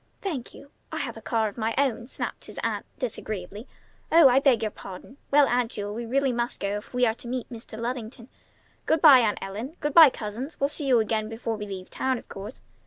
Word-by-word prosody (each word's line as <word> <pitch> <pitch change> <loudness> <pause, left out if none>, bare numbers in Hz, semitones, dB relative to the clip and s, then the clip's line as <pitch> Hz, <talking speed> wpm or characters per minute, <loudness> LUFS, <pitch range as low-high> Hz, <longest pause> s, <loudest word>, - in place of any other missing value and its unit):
"Thank 305 -12 -5
you! 280 - -14 0.2
I - - -4
have - - -3
a - - -10
car 225 -2 0
of 210 +3 -8
my 225 +1 -1
own!" 255 -4 0
snapped - - -5
his - - -9
aunt - - -2
disagreeably. 215 -3 -5 0.4
"Oh! 325 -4 +8
I 255 +2 +5
beg 260 -5 +3
your 215 - -1
pardon! 195 +8 -11
Well, 285 0 +5
Aunt 245 -1 +1
Jewel, 205 0 -4
we 235 +1 -5
really 270 +2 +1
must 240 0 -2
go 200 +1 -1
if 210 - -10
we 250 0 +2
are 225 - +2
to 235 - -10
meet 250 -1 -3
Mr. 225 -2 -9
Luddington. 235 0 -5 0.6
Good 320 - +3
by, 285 -5 +10
Aunt 220 -4 +1
Ellen! 220 - -6
Good 295 -1 -2
by, 325 -4 +10
cousins! 240 +6 -6
We'll 280 - +2
see 295 -1 -3
you 250 -3 +5
again 215 0 -1
before 225 0 -3
we 210 -1 -6
leave 190 -2 -7
town, 260 -1 0
of - - -12
course. 200 +5 -8
235 Hz, 230 wpm, -26 LUFS, 215-265 Hz, 0.6 s, by